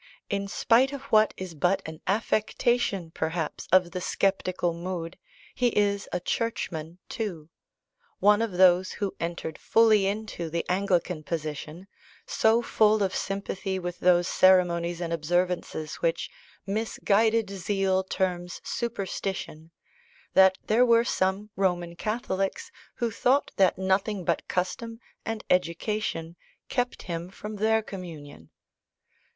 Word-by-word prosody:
In 200 0 -1
spite 240 +6 +3
of 280 - -6
what 215 0 +5
is 185 -2 -6
but 180 +5 +1
an 160 0 -9
affectation, 215 -3 0
perhaps, 160 -1 -3
of 180 -1 +4
the 180 - -4
sceptical 185 -2 0
mood, 170 0 -5 0.4
he 250 - +1
is 200 -1 +1
a 180 - -1
Churchman 175 -6 -3
too; 180 -10 -5 0.7
one 210 +2 +4
of 225 -4 -1
those 185 0 +4
who 200 -2 -3
entered 170 -2 -4
fully 215 -3 +4
into 200 -5 -3
the 170 +1 -2
Anglican 180 -3 0
position, 155 +2 -5 0.4
so 235 - +3
full 215 -2 +3
of 190 -1 -1
sympathy 195 -1 -3
with 175 -1 -5
those 175 0 +4
ceremonies 175 -2 +3
and 170 -1 -2
observances 170 -1 -1
which 165 0 -1 0.3
"misguided 220 +1 +1
zeal 195 0 0
terms 180 -2 -2
superstition," 195 -7 -4 0.6
that 190 0 +6
there 225 +3 +4
were 235 -1 +4
some 195 +1 0
Roman 175 -3 0
Catholics 195 -2 -2 0.2
who 235 -1 -1
thought 255 +6 +2
that 190 -2 +4
nothing 190 0 0
but 170 - 0
custom 225 +5 -3 0.3
and 225 -1 -3
education 175 -1 -1 0.3
kept 245 -1 -1
him 170 0 -5
from 210 +2 -8
their 220 +1 +2
communion. 155 - -9
190 Hz, 125 wpm, -27 LUFS, 175-215 Hz, 0.7 s, that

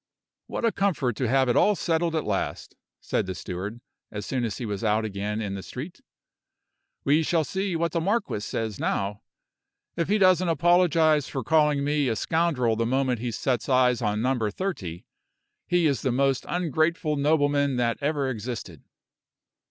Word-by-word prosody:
"What - - -3
a 230 - +3
comfort 165 - 0
to 130 - 0
have 130 +2 +3
it 120 - +2
all 210 - +4
settled 165 -2 0
at 155 - 0
last," 100 -2 -3 0.3
said - - -1
the 95 - -4
steward, 100 +7 -6 0.3
as 105 0 -5
soon 130 -2 -2
as 110 - -4
he 125 - -4
was 100 -1 -4
out 110 0 +2
again 105 +1 -3
in 100 -3 -3
the 100 - -5
street. 140 - -8 1.0
"We 150 +3 +3
shall 160 0 +1
see 190 +3 -2
what 170 +1 0
the 170 - -1
marquis 200 - 0
says 110 0 -4
now. 100 +1 -2 0.7
If 170 - -1
he 210 - +3
doesn't 185 -2 +4
apologize 165 -3 +3
for 135 - -4
calling 150 0 +3
me 145 -1 +1
a 115 - 0
scoundrel 145 -7 +1
the 115 +1 0
moment 130 -1 +1
he 120 +1 -3
sets 120 +3 -1
eyes 125 -2 +3
on 105 0 0
Number 125 -4 +1
Thirty, 100 - -5 0.6
he 175 -1 +2
is 140 -4 +1
the 130 - 0
most 135 +1 +1
ungrateful 160 -1 0
nobleman 145 -1 +2
that 120 -1 0
ever 145 -1 0
existed." 110 - -5
135 Hz, 175 wpm, -26 LUFS, 115-160 Hz, 1.0 s, all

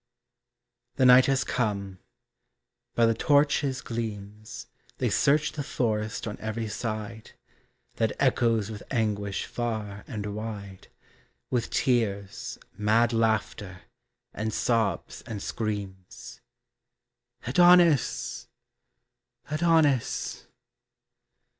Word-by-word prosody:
The 130 - +3
night 125 +1 +8
has 135 -1 +2
come. 100 -5 -2 1.0
By 115 - +4
the 115 - +3
torches' 140 +1 +2
gleams 110 0 -6 0.3
They - - 0
search 150 +2 +3
the 150 - -5
forest 110 -4 -2
on 105 - -6
every 110 +1 -3
side, 110 0 -5 0.6
That - - +1
echoes 115 -3 +2
with 105 -1 -7
anguish 105 -5 -1
far 110 -4 -4
and 105 -1 -5
wide, 105 -3 -7 0.6
With 120 -2 0
tears, 120 -1 -1 0.2
mad 110 +3 +2
laughter, 105 -5 -1 0.5
and 110 +1 -3
sobs 115 -2 -1
and 110 -3 -5
screams, 100 -4 -6 1.0
Adonis! 175 0 +4 1.0
Adonis! 155 -5 +1
110 Hz, 90 wpm, -27 LUFS, 105-125 Hz, 1.0 s, night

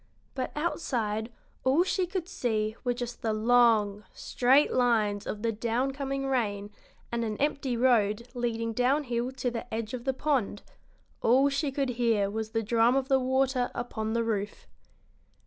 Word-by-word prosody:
But 260 -2 -3
outside 235 -8 -2 0.3
all 270 +7 +4
she 375 -1 0
could 360 -2 -4
see 220 - -1
were 245 -1 0
just 240 -1 -6
the 220 -1 0
long, 215 -2 +3
straight 265 +4 +2
lines 220 -5 +1
of 210 +1 -5
the 230 - +1
down 235 +4 -1
coming 275 0 -3
rain 210 -6 -1 0.4
and 235 0 -1
an 215 -2 -3
empty 280 -4 -1
road 235 -2 +2
leading 230 -2 -2
downhill 250 0 0
to 255 -2 -2
the 235 +1 -6
edge 225 0 -4
of 245 -2 -5
the 265 - +1
pond; 260 -8 -1 0.6
all 265 +5 +4
she 280 +1 -1
could 270 -1 -1
hear 210 -4 +2
was 220 0 -3
the 225 0 -1
drum 230 +3 +3
of 270 0 0
the 270 -1 +4
water 260 -1 +1
upon 220 -2 -3
the 230 0 +1
roof. 210 -2 -3
240 Hz, 165 wpm, -28 LUFS, 220-265 Hz, 0.6 s, all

